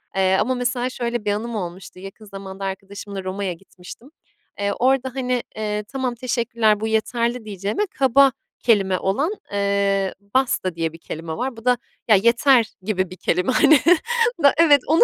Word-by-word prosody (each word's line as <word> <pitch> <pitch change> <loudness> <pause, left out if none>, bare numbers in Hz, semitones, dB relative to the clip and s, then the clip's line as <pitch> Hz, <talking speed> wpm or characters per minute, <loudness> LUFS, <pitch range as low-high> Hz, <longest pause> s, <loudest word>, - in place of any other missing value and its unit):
Eee, 190 0 +3
ama 255 +4 0
mesela 245 0 -1
şöyle 240 -3 -3
bir 205 - +1
anım 225 +3 -3
olmuştu. 180 -1 -7
Yakın 195 +3 -11
zamanda 195 -1 -8
arkadaşımla 195 0 -6
Roma'ya 190 0 -3
gitmiştim. 185 +7 -14 0.5
Eee, 200 0 0
orada 260 +1 +1
hani, 250 -2 -1
eee, 210 -1 -2
"Tamam, 260 -1 -3
teşekkürler. 235 -3 +1
Bu 220 - -2
yeterli." 235 +2 -1
diyeceğime. 205 - -2 0.2
Kaba 270 +1 +5 0.3
kelime 195 -5 +2
olan, 275 - 0 0.2
eee, 200 -1 0 0.2
basta 240 -9 +1
diye 165 -1 -2
bir - - -10
kelime 165 0 -7
var. 250 -1 -3
Bu 225 - -12
da 250 0 +4 0.3
"Ya, 220 - +6
yeter!" 235 +4 +4 0.2
gibi 185 -2 -1
bir 185 - -10
kelime, 180 +6 0
hani. 300 +3 +5 0.6
Na 285 -3 +5
evet, 300 -4 +6
onu 320 +3 +5
215 Hz, 165 wpm, -22 LUFS, 195-250 Hz, 0.6 s, Ya